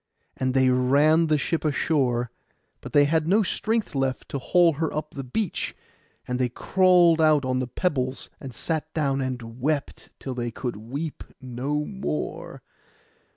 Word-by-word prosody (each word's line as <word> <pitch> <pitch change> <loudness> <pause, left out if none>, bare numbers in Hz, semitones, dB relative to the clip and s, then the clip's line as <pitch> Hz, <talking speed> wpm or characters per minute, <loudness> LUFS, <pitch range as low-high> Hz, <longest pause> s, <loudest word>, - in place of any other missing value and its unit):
And 130 0 -1
they 130 -1 +4
ran 145 +6 +4
the 155 -1 +3
ship 160 +3 -1
ashore; 130 -6 +1 0.5
but - - -8
they 145 -1 +5
had 160 +1 +1
no 205 +5 +4
strength 220 +2 -1
left 135 -2 -2
to 140 - -3
haul 170 +4 +4
her 160 - 0
up 155 0 -4
the 135 - -5
beach; 180 - -3 0.5
and 125 0 -2
they 125 -1 +1
crawled 175 +3 +4
out 155 -3 +4
on 130 0 0
the 130 - -2
pebbles, 130 -2 -2
and 135 - -8
sat 155 +5 -3
down, 140 -3 +1
and 125 -2 -5
wept 145 +1 -2
till 135 - -5
they 120 -1 -3
could 120 +1 -4
weep 140 +9 -5 0.2
no 135 +4 -3
more. 195 -5 -5
140 Hz, 160 wpm, -25 LUFS, 130-160 Hz, 0.5 s, they